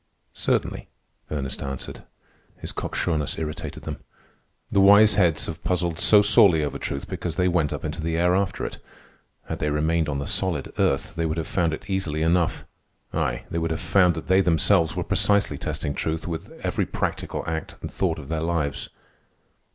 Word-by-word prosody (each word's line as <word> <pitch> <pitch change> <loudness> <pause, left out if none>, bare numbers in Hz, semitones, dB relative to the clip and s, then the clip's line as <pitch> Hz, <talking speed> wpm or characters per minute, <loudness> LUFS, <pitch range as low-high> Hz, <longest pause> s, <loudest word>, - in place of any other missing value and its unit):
"Certainly," - - -1 0.4
Ernest 70 -3 -4
answered. 70 -1 -6 0.6
His - - -6
cocksureness 75 -5 -2
irritated 75 -1 -5
them. - - -5 0.7
"The 100 - +4
wise 100 +2 +7
heads 90 -6 +2
have 80 -1 -7
puzzled 85 -1 -1
so 105 -1 +7
sorely 100 -6 +5
over 75 - -3
truth 70 - -4
because 85 -3 -4
they 90 +1 +2
went 85 -5 +1
up - - -4
into - - -4
the 80 +1 -1
air 90 +1 +3
after 95 +1 0
it. - - -6 0.7
Had - - -4
they 75 - 0
remained 80 +2 +1
on 70 - -1
the 70 - -3
solid 85 -6 -1
earth, - - +1
they 80 0 -1
would 80 +1 -2
have 80 - -2
found 85 -3 0
it 80 +5 -6
easily 85 -6 -1
enough—ay, 80 -7 -2
they 85 - -1
would 80 0 -1
have 80 - -2
found 90 0 +3
that 80 - -6
they 95 +1 +5
themselves 85 0 +3
were - - -1
precisely 100 -8 +2
testing 75 -2 -3
truth 80 +3 -3
with 80 -1 -5
every - - 0
practical - - -3
act 80 0 -4
and - - -6
thought - - 0
of 70 - -9
their 80 +1 -2
lives." 75 -4 -2
80 Hz, 180 wpm, -24 LUFS, 75-90 Hz, 0.7 s, wise